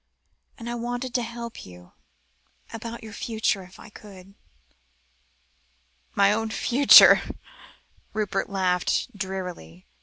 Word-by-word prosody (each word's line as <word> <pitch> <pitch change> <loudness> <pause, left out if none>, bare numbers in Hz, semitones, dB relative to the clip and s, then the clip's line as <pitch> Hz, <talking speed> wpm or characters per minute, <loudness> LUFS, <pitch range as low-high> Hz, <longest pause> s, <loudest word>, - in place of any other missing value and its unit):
And 230 - -9
I 240 - -4
wanted 245 +1 -5
to 245 - 0
help 235 0 -8
you 90 -1 -15 0.8
about 230 +1 -8
your 220 - -10
own 205 - -11
future, 220 -3 -1
if 185 0 -15
I 230 - -13
could." 195 -2 -14 1.8
"My 200 +1 +4
own 225 +1 -2
future," 255 +5 +7 0.9
Rupert 205 -2 -3
laughed 190 +4 -1
drearily. 180 - -7
210 Hz, 115 wpm, -24 LUFS, 190-235 Hz, 1.8 s, future